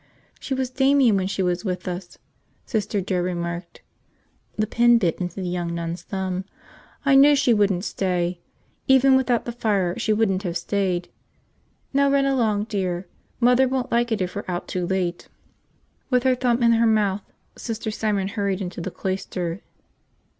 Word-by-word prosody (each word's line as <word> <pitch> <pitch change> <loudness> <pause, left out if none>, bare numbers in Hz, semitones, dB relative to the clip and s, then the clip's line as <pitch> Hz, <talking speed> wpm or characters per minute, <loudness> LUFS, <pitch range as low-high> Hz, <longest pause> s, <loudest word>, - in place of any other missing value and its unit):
"She 270 - -3
was 260 -1 -2
Damian 265 -4 +4
when 190 -1 0
she 195 0 -1
was 180 0 -1
with 185 -2 -3
us," 180 0 -6 0.5
Sister 210 -3 -1
Joe 185 -1 -1
remarked. 175 -1 -4 0.7
The 215 - +1
pin 240 +2 +4
bit 180 -5 0
into 175 -1 -3
the 185 -2 -4
young 175 -1 -2
nun's 170 +1 -4
thumb. 190 -2 -3 0.6
"I 275 - +4
knew 280 +2 +7
she 270 -4 +3
wouldn't 200 -3 +1
stay. 180 -2 -1 0.5
Even 265 0 +6
without 255 -3 +1
the 240 - -3
fire, 205 -7 0
she 225 - 0
wouldn't 210 -3 +1
have 175 -3 -2
stayed. 180 -1 -1 0.8
Now 280 0 +3
run 275 0 +3
along, 225 -7 +1
dear. 190 -4 -2 0.3
Mother 250 +2 +4
won't 255 -1 -2
like 235 0 +1
it 215 -3 0
if 180 0 -5
we're 205 - -3
out 175 -1 -3
too 180 -1 -2
late." 180 -2 -2 0.8
With 250 -2 +2
her 260 -1 +4
thumb 245 -1 +1
in 235 - +5
her 230 0 +4
mouth, 210 -2 +2 0.3
Sister 225 -2 -4
Simon 205 -3 -1
hurried 200 -2 -1
into 180 -2 -5
the 190 - -3
cloister. 185 -1 -4
200 Hz, 170 wpm, -23 LUFS, 180-240 Hz, 0.8 s, knew